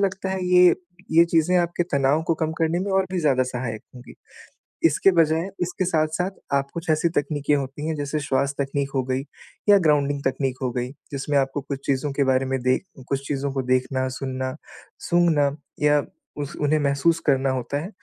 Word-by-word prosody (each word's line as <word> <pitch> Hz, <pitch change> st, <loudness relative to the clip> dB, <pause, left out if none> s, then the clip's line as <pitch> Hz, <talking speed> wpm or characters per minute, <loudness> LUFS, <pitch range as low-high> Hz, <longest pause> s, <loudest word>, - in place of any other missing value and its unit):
लगता 190 Hz, -1 st, -1 dB
है 190 Hz, -1 st, -2 dB
ये, 180 Hz, 0 st, +6 dB, 0.4 s
ये 165 Hz, +1 st, +7 dB
चीज़ें 170 Hz, +1 st, +2 dB
आपके 175 Hz, 0 st, 0 dB
तनाव 140 Hz, +3 st, +2 dB
को 165 Hz, -, +3 dB
कम 160 Hz, 0 st, 0 dB
करने 165 Hz, +1 st, +1 dB
में 200 Hz, +2 st, -2 dB
और 190 Hz, 0 st, +3 dB
भी 185 Hz, -, 0 dB
ज़्यादा 135 Hz, -5 st, +3 dB
सहायक 125 Hz, -3 st, -4 dB
होंगी। 125 Hz, -1 st, -12 dB, 0.7 s
इसके 165 Hz, +5 st, +4 dB
बजाय 165 Hz, +2 st, +2 dB
इसके 180 Hz, +1 st, -1 dB
साथ-साथ 165 Hz, +2 st, 0 dB, 0.3 s
आप 140 Hz, 0 st, 0 dB
कुछ 165 Hz, -1 st, -4 dB
ऐसी 155 Hz, +2 st, +3 dB
तकनीकें 145 Hz, 0 st, 0 dB
होती 140 Hz, +2 st, -4 dB
हैं, 160 Hz, -, -1 dB
जैसे 145 Hz, +1 st, -2 dB
श्वास 140 Hz, 0 st, 0 dB
तकनीक 140 Hz, 0 st, -1 dB
हो 135 Hz, -, +2 dB
गई 130 Hz, +1 st, -1 dB, 0.5 s
या 205 Hz, -1 st, +8 dB
ग्राउंडिंग 145 Hz, -1 st, +2 dB
तकनीक 130 Hz, 0 st, -1 dB
हो 125 Hz, -, 0 dB
गई, 125 Hz, 0 st, -3 dB, 0.2 s
जिसमें 140 Hz, +1 st, -2 dB
आपको 135 Hz, +1 st, 0 dB
कुछ 135 Hz, 0 st, -7 dB
चीज़ों 140 Hz, +1 st, 0 dB
के 140 Hz, 0 st, +1 dB
बारे 130 Hz, 0 st, +2 dB
में 130 Hz, 0 st, -1 dB
देख 130 Hz, +7 st, +1 dB, 0.2 s
कुछ 140 Hz, 0 st, -2 dB
चीज़ों 140 Hz, -1 st, -2 dB
को 135 Hz, -1 st, -1 dB
देखना, 130 Hz, +1 st, 0 dB
सुनना, 130 Hz, 0 st, -4 dB, 0.4 s
सूँघना 155 Hz, -5 st, +2 dB, 0.3 s
या 145 Hz, 0 st, +4 dB, 0.4 s
उस 145 Hz, -, -6 dB
उन्हें 150 Hz, +1 st, +2 dB
महसूस 140 Hz, +4 st, +2 dB
करना 135 Hz, -2 st, +3 dB
होता 130 Hz, +2 st, -2 dB
है, 175 Hz, -, -6 dB
145 Hz, 190 wpm, -23 LUFS, 135-165 Hz, 0.7 s, या